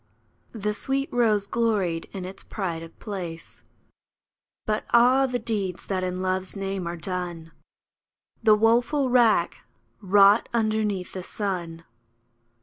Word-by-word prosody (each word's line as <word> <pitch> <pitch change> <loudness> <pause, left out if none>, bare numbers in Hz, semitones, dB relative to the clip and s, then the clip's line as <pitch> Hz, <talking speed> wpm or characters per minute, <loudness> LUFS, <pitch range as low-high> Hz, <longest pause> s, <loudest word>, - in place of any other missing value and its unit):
The 210 -2 -2
sweet 270 +6 -2
rose 215 -4 +2
gloried 200 -7 -1
in 190 -3 -6
its 190 +1 -7
pride 175 -6 -4
of 165 0 -12
place. 175 -6 -7 1.0
But 215 0 -1
ah! 255 +3 +5
the 250 -1 -1
deeds 210 -6 -3
that 190 -2 -2
in 185 0 -3
Love's 185 +1 -2
name 195 -2 -3
are 170 0 -4
done! 175 -2 -5 0.9
The 220 -2 +6
woeful 240 +5 +2
wrack 230 -8 +3 0.4
wrought 200 +2 +5
underneath 215 -4 0
the 185 - -5
sun 175 -4 -4
200 Hz, 125 wpm, -25 LUFS, 180-225 Hz, 1.0 s, The